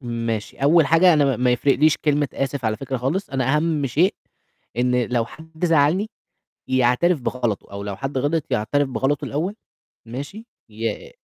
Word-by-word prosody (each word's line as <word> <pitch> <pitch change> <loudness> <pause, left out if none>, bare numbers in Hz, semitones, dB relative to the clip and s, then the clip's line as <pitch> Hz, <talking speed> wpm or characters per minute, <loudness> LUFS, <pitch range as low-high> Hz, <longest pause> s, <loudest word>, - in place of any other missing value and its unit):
ماشي، 115 -4 -4
أول 150 +3 +4
حاجة 175 +3 +5
أنا 150 -2 +4
ما 135 -3 +1
ما 125 +1 +2
يفرقليش 145 +4 +3
كلمة 145 -2 +1
آسف 135 -1 -3
على 110 -1 0
فكرة 135 +1 -4
خالص، 140 +11 -2
أنا 135 +2 +1
أهَم 155 -2 0
شيء 165 - +2 0.6
إن 125 0 +2
لو 120 -2 0
حد 160 +5 -6
زعّلني 165 +6 +2 0.6
يعترف 130 +6 +2
بغلطه، 120 -5 -3
أو 100 0 -5
لو 100 -1 -5
حد 135 0 -3
غلط 145 +3 0
يعترف 140 +7 +1
بغلطه 135 +2 -1
الأول 170 +8 -2 0.5
ماشي، 145 - -7 0.2
ي 115 - -4
135 Hz, 160 wpm, -22 LUFS, 125-160 Hz, 0.6 s, حاجة